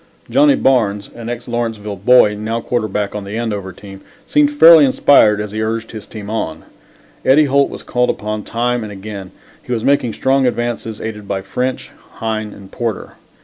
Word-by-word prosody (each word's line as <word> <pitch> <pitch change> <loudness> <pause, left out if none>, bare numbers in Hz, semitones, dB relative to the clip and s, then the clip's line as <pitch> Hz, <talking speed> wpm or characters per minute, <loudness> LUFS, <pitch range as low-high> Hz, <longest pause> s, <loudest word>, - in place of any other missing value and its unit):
Johnnie 285 0 +5
Barnes, 110 - +1
an 115 0 -8
ex 120 0 -6
Lawrenceville 115 -4 -3
boy, 105 +1 +5
now 110 +2 -3
quarterback 110 -4 -2
on 105 - -5
the 100 +3 -6
Andover 105 -5 -3
team, 95 +1 -12 0.2
seemed 295 -1 +2
fairly 170 - +8
inspired 130 -5 +4
as 105 -1 -4
he 110 +1 -3
urged 115 +1 -3
his 110 -2 -9
team 105 -2 -9
on. 80 -8 -4 0.6
Eddie 150 +3 +5
Holt 140 0 +2
was - - -9
called 125 0 0
upon 105 0 -3
time 120 +2 -1
and 105 - -7
again. 100 -1 -8 0.3
He - - -10
was 115 -2 -1
making 135 -5 +1
strong 135 +2 +1
advances, 120 -2 -3
aided 105 -2 -6
by 95 -1 -3
French, 125 +7 -3 0.2
Hine 110 -1 -3
and 95 -1 -13
Porter. 115 -4 -4
110 Hz, 180 wpm, -17 LUFS, 105-125 Hz, 0.6 s, fairly